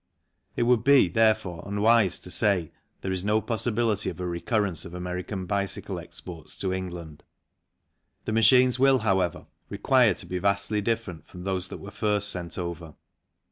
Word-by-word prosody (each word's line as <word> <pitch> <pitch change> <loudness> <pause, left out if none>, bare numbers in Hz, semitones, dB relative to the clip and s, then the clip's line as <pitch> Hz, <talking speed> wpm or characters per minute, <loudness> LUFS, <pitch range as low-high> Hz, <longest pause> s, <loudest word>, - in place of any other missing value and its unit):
It - - +1
would 120 -1 +3
be, 140 -7 +6
therefore, 105 -4 +1
unwise 105 0 +3
to 90 - -7
say 90 -3 +2 0.3
there 95 - -3
is 95 -1 -2
no 105 +2 +2
possibility 110 -1 -1
of - - -8
a 90 - -3
recurrence 90 +1 -1
of 90 -1 -9
American 90 +2 -4
bicycle 100 0 -2
exports 85 -4 -9
to 95 -1 -2
England; 85 -5 -6 1.0
the - - -2
machines 125 +3 +5
will, 135 0 +5
however, 95 -6 0 0.2
require 110 +1 +3
to - - -6
be 90 - -4
vastly 100 +2 0
different 110 -6 -3
from 90 -1 -10
those 95 -1 -2
that - - -8
were 100 - -10
first 105 -1 0
sent 90 -3 -5
over. 85 -3 -6
100 Hz, 160 wpm, -26 LUFS, 90-110 Hz, 1.0 s, be